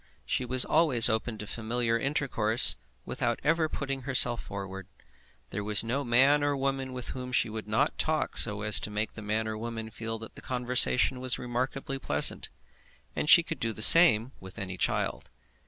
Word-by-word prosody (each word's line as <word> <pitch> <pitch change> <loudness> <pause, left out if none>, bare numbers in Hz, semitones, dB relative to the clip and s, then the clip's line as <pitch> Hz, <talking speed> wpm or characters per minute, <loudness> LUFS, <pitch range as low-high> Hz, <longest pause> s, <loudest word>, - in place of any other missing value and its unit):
She 130 - -3
was 125 +1 +5
always 150 -8 +3
open 110 0 -4
to 105 - -9
familiar 115 +2 -4
intercourse 115 -4 0 0.3
without 120 -1 -4
ever 160 +1 -1
putting 135 -2 -6
herself 125 -3 +2
forward. 95 -2 -9 0.6
There 105 - -6
was 105 +1 +2
no 125 +5 -4
man 135 +4 +2
or 145 -1 -2
woman 135 -1 -4
with 125 -1 -7
whom 125 -1 -8
she 120 - -1
would 110 0 -9
not 105 0 -1
so - - -1
talk 155 0 -3 0.3
as 105 - +5
to - - -6
make 105 +1 -5
the 110 - -11
man 110 +1 -4
or 110 0 -6
woman 115 -1 -8
feel 115 +1 -7
that 110 0 -12
the - - -13
conversation 125 +1 0
was 130 -1 +5
remarkably 130 +3 -6
pleasant, - - 0 0.7
and 150 - -3
she 170 - +8
could 165 -3 -8
do 115 -1 -3
the 110 - -2
same 130 -7 +8
with 95 +1 -13
any 95 -3 -7
child. 90 - -4
120 Hz, 185 wpm, -26 LUFS, 110-135 Hz, 0.7 s, she